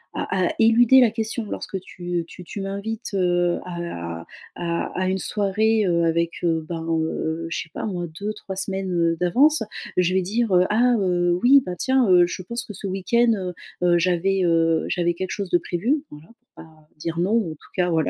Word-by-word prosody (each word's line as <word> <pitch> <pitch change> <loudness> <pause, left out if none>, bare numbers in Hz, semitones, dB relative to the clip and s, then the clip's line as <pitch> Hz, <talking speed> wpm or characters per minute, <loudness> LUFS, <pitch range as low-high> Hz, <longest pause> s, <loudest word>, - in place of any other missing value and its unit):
à 185 -2 0
à - - -2
éluder 235 +3 +6
la 235 -3 +4
question 225 +1 -3
lorsque 190 - -4
tu, 175 -1 -4
heu, - - -9
tu 180 +2 -12
tu 200 +3 -7
m'invites, 200 +4 -5
heu, 175 -2 +1
à 85 - -6 0.3
à 170 -1 -2 0.2
à 185 - 0
une 190 0 -1
soirée, 215 +2 +1
heu, 170 -1 +2
avec, 170 0 +1
heu, 165 -2 0
ben 165 -1 -4 0.2
heu, 160 +1 -2
je 165 - -2
sais 165 - -19
pas - - -3
moi 180 -5 -3
2-3 205 -2 -5
semaines, 190 0 -3
heu, 170 -1 +1
d'avance, 275 - +3 0.4
je 180 0 +2
vais 190 - +3
dire: 220 +4 -1 0.2
«Ah, 240 +3 +4
heu, 175 -2 +1
oui, 275 +3 +7
bah, 180 -1 -4
tiens, 260 +1 +2
heu, 180 -1 +6
je 180 - -5
pense 235 +6 -5
que 210 - -9
ce 200 - -6
week-end, 230 +6 +2
heu, 185 -3 -4 0.3
heu, 175 -1 +4
j'avais, 185 +2 +1
heu, 165 -1 +2
j'avais 175 -1 +1
quelque 185 +2 -5
chose 200 -3 -4
de 175 - +4
prévu», 245 - -1
voilà, 150 +2 -13
pour 245 - -48 0.2
pas 155 -1 -21
dire 165 +2 -4
non, 180 +4 +1
en 200 -8 -1
tout 155 - -14
cas, 180 -1 +1
voilà, 160 -1 +1
185 Hz, 205 wpm, -23 LUFS, 170-215 Hz, 0.4 s, oui